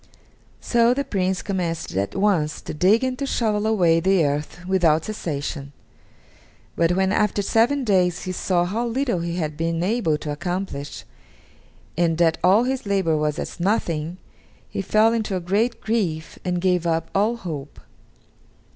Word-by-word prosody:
So 235 0 +3
the 280 - 0
Prince 190 -5 -1
commenced 175 - -3
at 100 +1 -1
once 185 -6 +1
to - - -6
dig 195 +10 +3
and 255 0 -2
to 280 - -2
shovel 215 -4 0
away 175 -7 +3
the 185 -1 +3
earth 150 +4 -3
without 170 -4 +2
cessation, 145 -8 -4 1.0
but 170 +1 +2
when 190 +1 +1
after 210 -1 +1
seven 240 +7 +2
days 185 -6 +2
he 185 - -3
saw 180 -1 0
how 225 +7 -2
little 240 -5 0
he 170 0 -3
had 155 -4 -2
been 165 +1 -1
able 190 -6 +1
to 150 0 -5
accomplish, 175 -2 -4 0.9
and 165 -1 +1
that 165 -1 +2
all 195 +6 +5
his 260 -3 -2
labor 190 -5 +1
was 150 0 0
as - - -6
nothing, 170 -4 -1 0.5
he - - -2
fell 215 +3 +3
into 220 -4 -1
a - - 0
great 205 +7 0
grief 180 -8 -2
and 180 -1 -1
gave 180 -2 +1
up 165 0 -1
all 210 +4 +2
hope. 150 -10 -7
185 Hz, 160 wpm, -23 LUFS, 165-215 Hz, 1.0 s, all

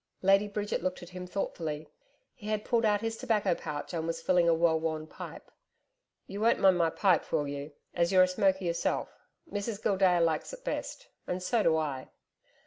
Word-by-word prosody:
Lady 195 +2 +5
Bridget 205 0 -2
looked 185 -1 -3
at 175 - -10
him 180 0 -7
thoughtfully. 160 -5 -4 0.5
He 210 - -11
had 215 -1 -1
pulled 235 -1 +2
out 205 -1 +2
his 225 0 -3
tobacco 215 -7 +1
pouch 150 -2 -6
and 165 -1 -2
was 165 0 -2
filling 175 0 +3
a - - +5
well 165 -1 +3
worn 160 -1 -2
pipe. - - -10 0.7
'You 200 +2 -6
won't 230 +1 +4
mind 190 -2 +4
my 165 -1 +3
pipe, 185 0 +2
will 150 -3 +1
you 140 +1 -5 0.2
as 170 +1 +1
you're 185 -1 +7
a - - +4
smoker 190 +1 +1
yourself. 170 0 -1 0.4
Mrs 205 +1 -3
Gildea 190 -4 +3
likes 165 - 0
it - - -10
best - - -4 0.2
And 180 0 -3
so 230 +4 +2
do 160 -5 +3
I.' 140 -4 -3
180 Hz, 195 wpm, -30 LUFS, 165-205 Hz, 0.7 s, you're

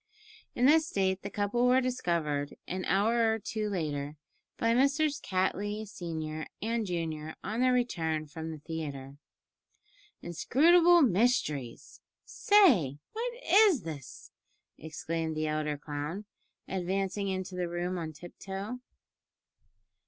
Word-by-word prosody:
In 245 - +2
this 315 +3 +5
state 190 -4 0
the 200 - -5
couple 205 +5 +1
were 255 +1 +5
discovered 170 - -1
an 185 0 -3
hour 225 +3 +3
or 220 - 0
two 215 0 -3
later 150 -5 -3 0.4
by 230 0 +2
Messrs. 280 +3 +2
Cattley 205 +3 -1
senior 160 -4 -5
and 225 -1 -1
junior 160 -3 -3
on 215 +5 -2
their 255 0 +4
return 160 -11 0
from 160 +2 -7
the 160 - -6
theatre. 145 -3 -6 1.1
"Inscrutable 335 - +5
mysteries! 175 - 0 0.2
say, 250 - +4 0.2
what 475 +2 -3
is 395 - +5
this?" 150 -5 -9 0.4
exclaimed 160 0 -4
the 155 - 0
elder 155 -1 -1
clown, 150 +7 -5 0.4
advancing 195 +2 -2
into 190 -1 -3
the 180 -1 -2
room 175 +1 -2
on 160 -1 -4
tiptoe. 195 +8 -7
185 Hz, 120 wpm, -30 LUFS, 155-235 Hz, 1.1 s, this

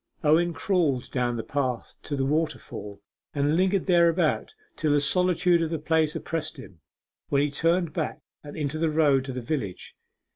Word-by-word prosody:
Owen 165 +3 +4
crawled 165 -8 0
down 120 -2 0
the 115 - -3
path 130 -4 -2
to 145 - -4
the 135 -1 0
waterfall, 140 -9 -3 0.3
and 145 +2 +2
lingered 190 +2 +2
thereabout 170 - +2 0.2
till 155 -2 0
the 145 - +4
solitude 180 +2 +2
of 165 - 0
the 165 - -1
place 160 +1 +1
oppressed 160 -1 -4
him, 95 -10 -12 0.5
when 140 0 +3
he 145 - -1
turned 165 +2 +1
back 160 -2 -3 0.2
and 145 +1 -9
into 150 0 -2
the 165 0 +2
road 150 -4 +3
to 135 - -5
the 125 0 -4
village. 120 - -4
155 Hz, 175 wpm, -26 LUFS, 140-165 Hz, 0.5 s, Owen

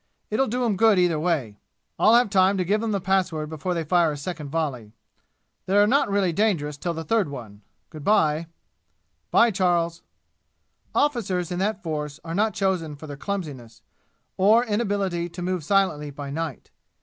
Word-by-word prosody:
It'll 265 +5 +2
do 245 +3 -1
'em 210 -5 0
good 220 -1 +5
either 175 -3 +2
way. 150 -11 -1 0.4
I'll 220 - +6
have 240 -4 +3
time 195 0 +4
to 185 - 0
give 210 +4 +1
'em 225 -1 -1
the 200 - 0
password 180 -5 0
before 165 +4 -3
they 165 - -1
fire 170 0 +2
a 145 - -5
second 150 -1 -6
volley. 135 -9 -3 0.7
They're 205 +2 +5
not 250 +1 +2
really 195 -3 +1
dangerous 160 -7 0
till 170 +3 -3
the 165 - -4
third 205 -1 +1
one. 110 -7 -9 0.3
Good 155 -3 -9
by!" 160 -5 +2 0.8
"By, 235 0 +5
Charles!" 175 -3 0 0.9
Officers 195 - 0
in 175 - -2
that 205 +1 -1
force 150 -2 -4
are 165 - -5
not 215 +4 +1
chosen 180 -6 -1
for 145 - -11
their 145 -2 -7
clumsiness, 135 - -6 0.5
or 215 +6 +5
inability 200 -6 -1
to 175 +1 -8
move 180 -2 -2
silently 170 -4 +1
by 140 0 -7
night. 160 -2 -5
175 Hz, 175 wpm, -24 LUFS, 150-200 Hz, 0.9 s, I'll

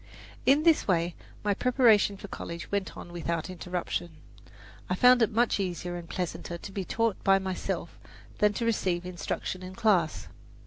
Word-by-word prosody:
In 280 +3 +5
this 330 -2 +4
way 175 -2 +1 0.3
my 205 -1 +2
preparation 225 -4 +4
for 200 - -9
college 170 -3 -7
went 200 -1 -2
on 175 - -9
without 170 0 -3
interruption. 175 -2 -4 0.7
I 180 - +1
found 250 +4 +6
it 225 - +4
much 230 0 +2
easier 175 -2 -3
and 170 -1 -8
pleasanter 175 -1 -4
to 195 - -9
be 195 0 -3
taught 225 +2 -1
by 195 0 +5
myself 190 -1 -4 0.4
than 210 0 +4
to 230 - -2
receive 185 -6 0
instruction 180 +1 -4
in 185 0 -8
class. 190 -8 +2
190 Hz, 165 wpm, -28 LUFS, 175-215 Hz, 0.7 s, found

